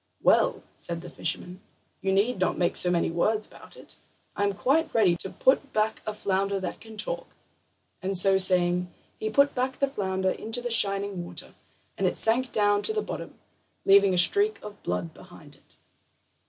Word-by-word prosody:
"Well," - - +3
said 170 -1 -6
the 175 - -10
fisherman, 180 +3 -5 0.4
"you 190 - -1
need 200 +3 +1
not 185 - 0
make 175 - 0
so 180 - +4
many 170 -2 0
words 210 +6 0
about - - -13
it. - - -12 0.4
I 205 - -1
am 200 - 0
quite 295 +10 +1
ready 195 -6 +4
to 190 - -6
put 275 +6 +1
back 215 +1 -1
a 215 - -2
flounder 195 0 -1
that 185 - -5
can 220 0 -12
talk." - - -4 0.7
And 190 0 0
so 190 +1 +5
saying, 180 -1 +3 0.3
he 215 - -2
put 280 +5 +3
back 260 +1 -2
the 275 - +2
flounder 190 -8 -2
into 225 +5 -3
the 245 0 -4
shining 200 -4 +1
water, 175 - -8 0.5
and - - +2
it - - -2
sank 245 +3 +2
down 205 -1 +2
to 435 - +1
the 430 -1 -1
bottom, - - -7 0.5
leaving 195 -1 +5
a - - -1
streak 405 - +5
of 210 -1 -10
blood 90 -2 -4
behind - - -15
it. - - -23
200 Hz, 185 wpm, -26 LUFS, 185-225 Hz, 0.7 s, so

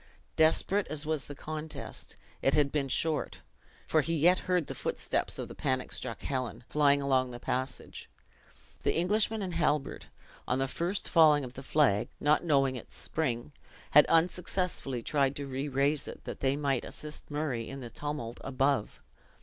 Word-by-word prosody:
Desperate 180 +5 +3
as 150 +1 -3
was 155 -3 -1
the 145 - -7
contest, 155 +2 -6 0.3
it 135 - +3
had 145 -2 +3
been 145 -3 0
short; 155 +3 0 0.5
for 155 - +3
he 165 +3 -1
yet 175 +4 +5
heard 180 -3 +2
the - - -6
footsteps - - -1
of - - -4
the - - -9
panic 130 -2 -1
struck 115 - -5
Helen, 130 -3 -3
flying 145 -1 +3
along 130 -2 +2
the 120 0 -8
passage. 130 +2 -4 0.7
The - - +1
Englishman 210 +5 +1
and 180 -2 -4
Halbert, 145 -3 0 0.4
on 125 - +1
the 135 0 0
first 175 +8 -1
falling 155 -3 +5
of 125 -1 -7
the 135 - -8
flag, 135 -7 +2
not 150 +3 +3
knowing 135 -5 +2
its 125 - -8
spring, 135 -4 -2 0.4
had 150 - +8
unsuccessfully 170 -6 0
tried 140 0 +1
to 140 - -4
re 135 +1 -3
raise 140 +2 +1
it, - - -9
that - - -6
they 135 0 +1
might 140 -3 0
assist 150 0 -6
Murray 145 -6 -2
in 135 0 -7
the 120 -2 -8
tumult 135 -3 -5
above. 135 -3 0
145 Hz, 170 wpm, -30 LUFS, 135-155 Hz, 0.7 s, had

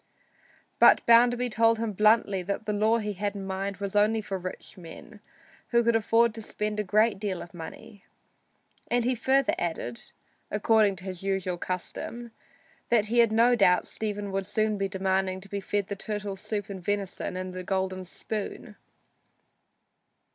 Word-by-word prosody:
But - - +6
Bounderby 245 +1 +5
told 225 +1 +3
him 225 -1 -2
bluntly 210 -1 +3
that 200 +4 -4
the 210 - -1
law 215 +2 +3
he 210 -2 -3
had 205 +1 -3
in 195 -1 -5
mind 195 0 -3
was 200 0 -5
only 215 +2 +3
for 195 -3 -4
rich 185 0 -8
men, 190 +5 -12 0.5
who 235 0 +3
could 235 0 +2
afford 225 +1 +3
to 225 - -7
spend 210 0 -3
a - - +1
great 210 +1 +2
deal 195 -3 -3
of 175 - -10
money. 185 +4 -10 0.8
And 240 -1 +1
he 255 - +2
further 265 +3 +2
added 160 -8 -3 0.5
(according 210 -1 +3
to 180 - -13
his 185 -2 -6
usual 190 -2 -2
custom) 230 +7 -5 0.6
that 230 -3 +3
he 240 +1 +2
had 230 -2 +5
no 235 +2 +4
doubt 180 -5 +4
Stephen 205 -2 -4
would 195 -1 -2
soon 215 +1 0
be 195 - 0
demanding 190 -1 -1
the 200 +1 -3
turtle 205 -2 -4
soup 205 +1 -4
and 190 -2 -7
venison 195 -2 -3
and 185 0 -5
the 185 0 -6
golden 190 0 -2
spoon. 205 +3 -6
205 Hz, 160 wpm, -27 LUFS, 190-220 Hz, 0.8 s, But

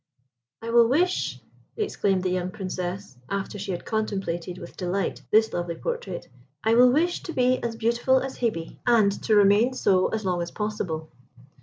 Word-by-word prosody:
"I 230 - -3
will 235 -1 +6
wish," 350 +9 +1 0.4
exclaimed 200 - 0
the 185 - 0
young 180 0 -1
Princess, 185 - -5
after 200 +1 -3
she 195 0 -4
had 175 - -5
contemplated 195 -5 -2
with 170 -2 -10
delight 185 +1 -2
this 220 +1 +4
lovely 175 -1 -2
portrait, 485 - -4 0.4
"I 225 - +3
will 245 +1 +7
wish 340 +6 +1
to 335 - -6
be 255 -1 +2
as 235 -1 -2
beautiful 235 +3 +2
as 265 0 -6
Hebe, 215 -9 -2
and 220 -4 +5
to 220 - +2
remain 205 +5 +4
so 185 -6 +3
as 220 -2 -3
long 180 -2 0
as 170 - -3
possible." 185 -7 -4
210 Hz, 170 wpm, -25 LUFS, 185-240 Hz, 0.4 s, will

